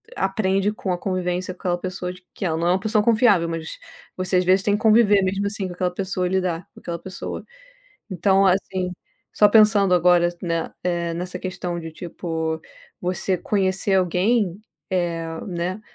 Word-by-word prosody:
aprende 195 0 +1
com 195 -3 -3
a - - -2
convivência 185 0 -2
com 180 - -23
aquela 175 -1 0
pessoa 180 0 -4
de 185 0 -17
que 200 - -4
ela 160 -3 0
não 170 +1 0
é - - +4
uma 185 - +2
pessoa 215 +1 +1
confiável, 210 -7 +4
mas 165 -1 -5 0.4
você, 185 0 +1
às 180 - +2
vezes, 190 +2 +4
tem 205 0 +2
conviver 215 -2 +5
mesmo 195 +2 -1
assim 200 -2 -3
com 180 - -7
aquela 180 0 -1
pessoa, 185 -1 -2
lidar 180 -2 -1
com - - -14
aquela 170 -1 -4
pessoa. 190 +2 -7 0.7
Então, 195 +2 +3
assim, 185 -1 0 0.4
só 210 - +6
pensando 210 -3 +5
agora, 175 0 +5
s 175 0 -6
né, 165 -2 -2
eh, 170 -1 -1
nessa 180 +1 -5
questão 180 -2 -4
de 165 -1 -7
tipo, 160 -1 -4 0.4
você 185 +1 -1
conhecer 195 0 0
alguém, 190 +2 +1 0.3
eh, 170 -3 -1 0.2
né, 180 +2 -3
185 Hz, 175 wpm, -23 LUFS, 175-195 Hz, 0.7 s, só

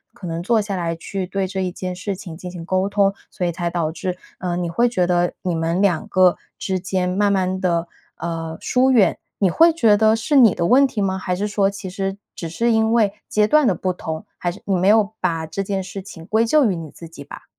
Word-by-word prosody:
可 205 - -10
能 165 -1 -3
坐 225 +5 +2
下 205 -2 -2
来， 170 -2 -2
去 185 +3 -5
对 195 +1 -1
这 190 0 -3
一 180 - -2
件 185 0 -5
事 195 +2 -4
情 180 -3 -9
进 180 +2 -8
行 175 -2 -8
沟 185 +2 0
通， 200 -1 +2 0.2
所 180 - -3
以 175 - 0
才 170 +1 -2
导 170 -2 -1
致， 180 +2 -4 0.2
呃， 175 -2 -2
你 175 -1 -2
会 240 +8 +2
觉 185 -7 +1
得 175 0 +1
你 180 -2 -1
们 165 +2 -1
两 195 +1 +1
个 185 -3 +4 0.2
之 190 -1 -2
间 185 0 -1
慢 200 +3 +1
慢 190 -1 0
地， 170 -2 0 0.3
呃， 165 -1 -4
疏 260 +1 +2
远， 210 -9 +4 0.2
你 195 - +3
会 330 - +5
觉 225 -10 +4
得 220 +1 +4
是 225 +6 -1
你 230 -8 +6
的 170 - 0
问 270 +3 +5
题 225 -5 -4
吗？ 190 -1 0
还 180 -1 -2
是 200 +3 -2
说 200 -1 +1
其 200 -1 -7
实 195 +1 -3 0.2
只 170 - -5
是 235 +9 0
因 220 0 +2
为 215 -4 +3
阶 210 0 +2
段 300 +1 +4
的 195 - +2
不 185 +2 -1
同， 160 -2 -6
还 175 - -2
是 190 - -12
你 195 - +1
没 185 +1 +1
有 215 0 +4
把 165 -3 -1
这 160 +5 -4
件 195 -1 -2
事 195 +1 -7
情 165 -4 -11
归 220 +5 +2
咎 295 +4 +4
于 - - -2
你 165 -2 -7
自 165 - -11
己 150 -3 -11
吧？ - - -11
190 Hz, 270 characters per minute, -21 LUFS, 175-205 Hz, 0.3 s, 你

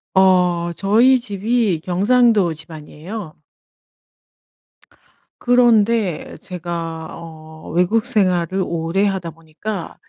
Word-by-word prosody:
어 180 -2 +3
저희 230 +7 +3
집이 210 -4 -1
경상도 205 0 +2
집안이에요. 155 +4 -9 2.0
그런데 230 -6 +2
제가 165 -2 -6
어 160 -1 -12
외국 180 +8 +1
생활을 185 -5 +2
오래 170 +4 -1
하다 190 -4 -2
보니까 165 +4 -7
185 Hz, 185 characters per minute, -19 LUFS, 165-215 Hz, 2.0 s, 어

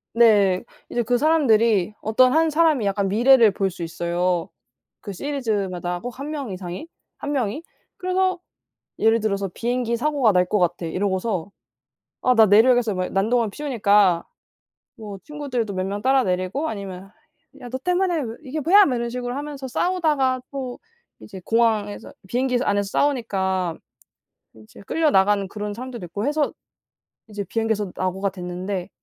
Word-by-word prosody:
네. 205 -5 +4 0.3
이제 240 - -1
그 245 +2 +1
사람들이 230 - +3
어떤 250 +4 +3
1 320 0 +3
사람이 310 -5 +3
약간 200 0 0
미래를 230 +2 +5
볼 195 0 -1
수 - - -3
있어요. 175 +1 -1 0.5
그 200 - -7
시리즈마다 195 -8 -2
꼭 245 0 -7
1 285 +2 -5
명 285 -6 -4
이상이, 185 - -6 0.3
1 290 - -5
명이. 260 0 -1 0.4
그래서 370 0 0 0.6
예를 225 +1 +4
들어서 200 -2 -1
"비행기 240 +1 -1
사고가 275 -2 +2
날 180 -1 +3
것 210 - 0
같아." 175 -1 0
이러고서 190 +1 -2 0.7
"아 250 0 +3
나 225 -1 +7
내려야겠어." 225 +2 +4
막 185 0 -2
난동을 225 +3 +1
피우니까 205 - +2 0.7
뭐 210 -3 -8
친구들도 260 -8 -4
몇 185 0 -2
명 200 +1 -4
따라 265 0 +4
내리고 185 - -1
아니면 195 -2 -7 0.5
"야 245 - -8
너 260 - -3
때문에 360 +1 0
왜 230 -4 -5
이게 290 +2 -4
뭐야?" 390 +7 +6
뭐 255 -3 0
이런 235 0 -2
식으로 245 0 -4
하면서 285 -1 -6
싸우다가 290 -4 +1
또 260 -3 -5 0.4
이제 195 -3 -10
공항에서 220 -3 0 0.2
비행기에서 250 +3 0
안에서 200 -1 0
싸우니까 190 - 0 0.8
이제 110 - -15
끌려나가는 205 -11 +2
그런 210 +1 -5
사람들도 245 -3 -7
있고 200 +5 -5
해서 295 0 0 0.8
이제 205 -2 -5
비행기에서 220 -3 -1
낙오가 190 +2 -1
됐는데. 180 0 -5
225 Hz, 330 characters per minute, -22 LUFS, 195-265 Hz, 0.8 s, 나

